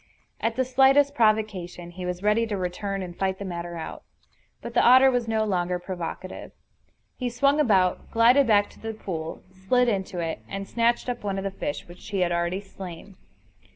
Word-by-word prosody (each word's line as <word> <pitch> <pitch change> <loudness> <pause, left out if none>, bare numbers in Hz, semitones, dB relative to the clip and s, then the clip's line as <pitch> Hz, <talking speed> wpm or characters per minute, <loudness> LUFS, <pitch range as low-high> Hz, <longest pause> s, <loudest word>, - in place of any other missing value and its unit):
At 225 0 -1
the 260 +1 +1
slightest 270 +2 +4
provocation 210 -7 0
he 180 +1 -6
was 180 +1 -4
ready 215 +2 +2
to 210 -2 -2
return 190 +2 -3
and 175 -1 -8
fight 190 0 -1
the 200 - -6
matter 175 -1 -5
out. 160 - -7 0.6
But 235 - -8
the - - +4
otter 260 +2 +7
was 245 -2 0
no 220 -1 +1
longer 180 -3 0
provocative. 180 0 -6 0.6
He 250 -2 -2
swung 275 +5 +2
about, 190 -10 +2
glided 245 +4 +5
back 205 -2 +4
to - - -18
the 225 0 -5
pool, 165 -6 -6
slid 190 +7 +1
into 190 -4 -1
it, 165 -2 -2
and 195 0 -5
snatched 235 +3 +1
up 245 -2 -3
one 200 -1 -2
of 195 - -3
the 195 - -2
fish 150 -6 -5
which 175 +4 -13
he 200 -2 -1
had 175 -1 +2
already 170 +2 -1
slain. 190 -1 -10
200 Hz, 190 wpm, -25 LUFS, 180-235 Hz, 0.6 s, otter